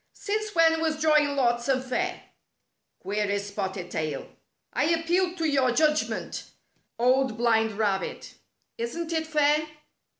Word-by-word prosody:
"Since 425 Hz, -1 st, -3 dB
when 325 Hz, -1 st, +4 dB
was 315 Hz, -1 st, 0 dB
drawing 300 Hz, -2 st, +3 dB
lots 240 Hz, -1 st, +1 dB
unfair?" 260 Hz, +7 st, -1 dB, 0.8 s
queried 205 Hz, 0 st, 0 dB
Spotted 190 Hz, -3 st, -5 dB
Tail. 155 Hz, -3 st, -3 dB, 0.3 s
" -, -, -52 dB
I -, -, +1 dB
appeal 340 Hz, +3 st, +1 dB
to 330 Hz, -3 st, 0 dB
your 270 Hz, -4 st, +2 dB
judg 305 Hz, +2 st, +2 dB
ment, -, -, -5 dB, 0.5 s
Old 255 Hz, 0 st, +2 dB
Blind 225 Hz, -2 st, +2 dB
Rabbit. 200 Hz, -2 st, -2 dB, 0.5 s
Isn't 325 Hz, +9 st, -3 dB
it 320 Hz, -1 st, -1 dB
fair?" 300 Hz, 0 st, +2 dB
280 Hz, 130 wpm, -26 LUFS, 225-320 Hz, 0.8 s, when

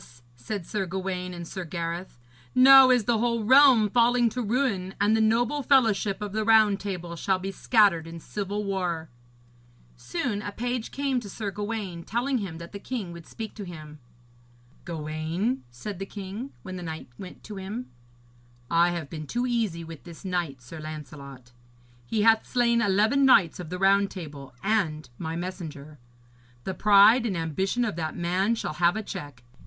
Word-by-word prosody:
said 165 Hz, -, -5 dB
Sir 195 Hz, 0 st, -3 dB
Gawaine 185 Hz, 0 st, -3 dB
and 175 Hz, -1 st, -7 dB
Sir 185 Hz, +1 st, -5 dB
Gareth, 170 Hz, -1 st, -5 dB, 0.4 s
'now 265 Hz, 0 st, +9 dB
is 250 Hz, -3 st, +4 dB
the 230 Hz, +1 st, +1 dB
whole 235 Hz, -1 st, 0 dB
realm 260 Hz, -2 st, +7 dB
falling 240 Hz, +2 st, +3 dB
to 250 Hz, +3 st, -4 dB
ruin, 215 Hz, -5 st, -1 dB
and 205 Hz, +2 st, +3 dB
the 220 Hz, -, +2 dB
noble 230 Hz, +6 st, +2 dB
fellowship 215 Hz, -7 st, +2 dB
of 205 Hz, -, -4 dB
the 215 Hz, +1 st, -1 dB
Round 215 Hz, -2 st, +5 dB
Table 175 Hz, -4 st, -5 dB
shall 190 Hz, +3 st, 0 dB
be 190 Hz, +1 st, -5 dB
scattered 195 Hz, -6 st, +3 dB
in 165 Hz, 0 st, -8 dB
civil 205 Hz, +4 st, -4 dB
war.' 180 Hz, -5 st, -2 dB, 0.9 s
Soon 205 Hz, -, -3 dB
a 205 Hz, -, -5 dB
page 245 Hz, +2 st, -3 dB
came 275 Hz, -2 st, -1 dB
to 215 Hz, -4 st, -9 dB
Sir 205 Hz, +1 st, -4 dB
Gawaine, 205 Hz, -3 st, -4 dB
telling 245 Hz, +7 st, -1 dB
him 185 Hz, -6 st, -5 dB
that 170 Hz, 0 st, -9 dB
the 200 Hz, -, -7 dB
king 210 Hz, -5 st, -5 dB
would 170 Hz, -1 st, -11 dB
speak 220 Hz, -2 st, -7 dB
to 210 Hz, -, -7 dB
him. 155 Hz, -4 st, -10 dB, 0.9 s
'Gawaine,' 165 Hz, -, -2 dB
said 170 Hz, -, -7 dB
the 195 Hz, -, -5 dB
king, 205 Hz, +7 st, -7 dB
when 185 Hz, 0 st, -6 dB
the -, -, -7 dB
knight 160 Hz, -5 st, -7 dB
went 185 Hz, -2 st, -10 dB
to 210 Hz, -, -8 dB
him, 210 Hz, +6 st, -6 dB, 0.8 s
'I 170 Hz, +1 st, +4 dB
have 170 Hz, -4 st, -4 dB
been 155 Hz, 0 st, -7 dB
too 245 Hz, -, -1 dB
easy 225 Hz, -9 st, -1 dB
with 165 Hz, -2 st, -10 dB
this 170 Hz, +3 st, -12 dB
knight, 170 Hz, -9 st, -3 dB
Sir 155 Hz, +6 st, -10 dB
Lancelot. 140 Hz, -5 st, -9 dB, 0.6 s
He 215 Hz, -2 st, 0 dB
hath 225 Hz, 0 st, +4 dB
slain 235 Hz, -1 st, +2 dB
eleven 215 Hz, +7 st, +3 dB
knights 200 Hz, -, +5 dB
of 175 Hz, -3 st, -7 dB
the 180 Hz, -, -4 dB
Round 195 Hz, +1 st, +3 dB
Table 145 Hz, -7 st, -9 dB
and 170 Hz, -9 st, 0 dB
my 160 Hz, -1 st, -4 dB
messenger. 160 Hz, -5 st, -7 dB, 0.6 s
The 190 Hz, -, -3 dB
pride 210 Hz, +5 st, +6 dB
and 190 Hz, -5 st, -2 dB
ambition 190 Hz, +9 st, -1 dB
of 215 Hz, -, -3 dB
that 160 Hz, -2 st, -3 dB
man 185 Hz, +6 st, +1 dB
shall 190 Hz, -, -4 dB
have 170 Hz, +3 st, +2 dB
a 220 Hz, -, -3 dB
check. 145 Hz, -9 st, -8 dB
195 Hz, 175 wpm, -26 LUFS, 170-220 Hz, 0.9 s, now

